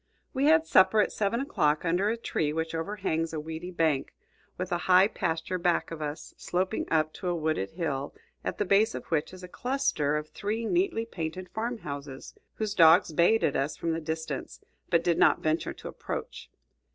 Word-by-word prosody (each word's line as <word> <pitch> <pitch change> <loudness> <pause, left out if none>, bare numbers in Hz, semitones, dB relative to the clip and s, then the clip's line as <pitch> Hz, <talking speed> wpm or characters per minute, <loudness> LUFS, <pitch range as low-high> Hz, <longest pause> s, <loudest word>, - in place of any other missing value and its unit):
We 270 +2 +1
had 320 +1 +5
supper 190 -4 +5
at 210 - +3
seven 215 +4 0
o'clock, 155 - +1
under 180 +5 +2
a 230 - -1
tree 155 -9 -1
which 160 +1 -3
overhangs 165 -2 -2
a 155 - -2
weedy 160 +3 -6
bank, 160 -6 0 0.4
with 185 0 -4
a 175 - +1
high 185 +2 +7
pasture 165 -2 -2
back 175 -1 +1
of 165 -1 -6
us, 150 0 -5
sloping 185 +4 -2
up 155 -1 +1
to 185 - -6
a 175 - +1
wooded 155 - -1
hill, 145 -5 -3 0.3
at - - -3
the 205 - 0
base 205 +4 +3
of - - -6
which 155 -2 0
is 185 0 -11
a - - -7
cluster 210 - 0
of 150 0 -5
three 220 +3 -3
neatly 345 - +1
painted 180 -2 -5
farm 235 +2 -3
houses, 140 -6 -7 0.2
whose 215 -2 -2
dogs 165 -2 +6
bayed 175 +8 +4
at 140 - +1
us 145 +2 -1
from 165 - -1
the 165 - -3
distance, 160 +1 -5 0.3
but 170 -1 +3
did 170 -1 +1
not - - +4
venture 155 +1 0
to - - -10
approach. - - -6
170 Hz, 195 wpm, -28 LUFS, 160-205 Hz, 0.4 s, high